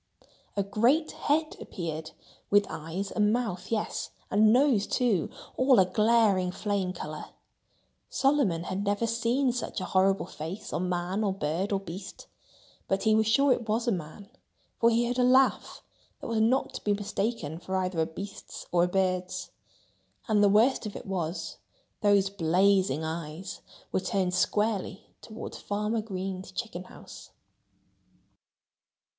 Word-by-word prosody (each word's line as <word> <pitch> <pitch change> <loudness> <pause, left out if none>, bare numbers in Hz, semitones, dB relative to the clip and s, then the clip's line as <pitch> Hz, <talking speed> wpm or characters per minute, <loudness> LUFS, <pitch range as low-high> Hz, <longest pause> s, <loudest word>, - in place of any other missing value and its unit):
A 200 - +2
great 240 +11 +2
head 310 +2 0
appeared, 160 -3 -5 0.4
with 205 0 +5
eyes 165 +6 -4
and 210 -1 +2
mouth—yes! 220 -2 -2 0.2
and 215 +1 +5
nose, 250 -4 +4
too—all 250 - +1
a 190 - +6
glaring 210 -2 +3
flame 200 -1 -1
color. 155 -4 -6 0.8
Solomon 270 - +2
had 190 +3 -3
never 205 +2 0
seen 235 +3 +1
such 245 0 -4
a - - -3
horrible 190 0 +2
face 180 +4 -7
on 180 +1 -1
man 180 +4 -1
or 200 - +1
bird 185 +2 -2
or 195 - +1
beast. 190 0 -9 0.6
But 195 - 0
he 220 -1 +4
was 220 0 +3
sure 275 +4 +5
it 235 -3 -5
was 230 +3 0
a - - +3
man, 185 +4 -6 0.5
for 230 - +5
he 235 +1 +2
heard 245 +1 -1
a - - +4
laugh 260 +1 +3 0.4
that - - -9
was 225 -1 0
not 255 +5 +2
to - - -7
be 205 -1 +2
mistaken 200 -5 -3
for 190 +2 -4
either 185 -2 -1
a 160 - +1
beast's 200 +4 -8
or 175 0 +4
a - - -1
bird's. 185 -1 -1 0.8
And 210 -2 +3
the 200 - +6
worst 220 +3 +3
of 205 - -8
it - - -7
was, 180 -3 -3 0.4
those 200 -2 +3
blazing 185 -3 +2
eyes 160 +3 -5 0.3
were - - +1
turned 185 -1 -1
squarely 205 +1 -1
toward 220 0 -8
Farmer 210 +2 -2
Green's 190 -2 -5
chicken 215 -6 -5
house! - - -12
200 Hz, 150 wpm, -28 LUFS, 185-225 Hz, 0.8 s, a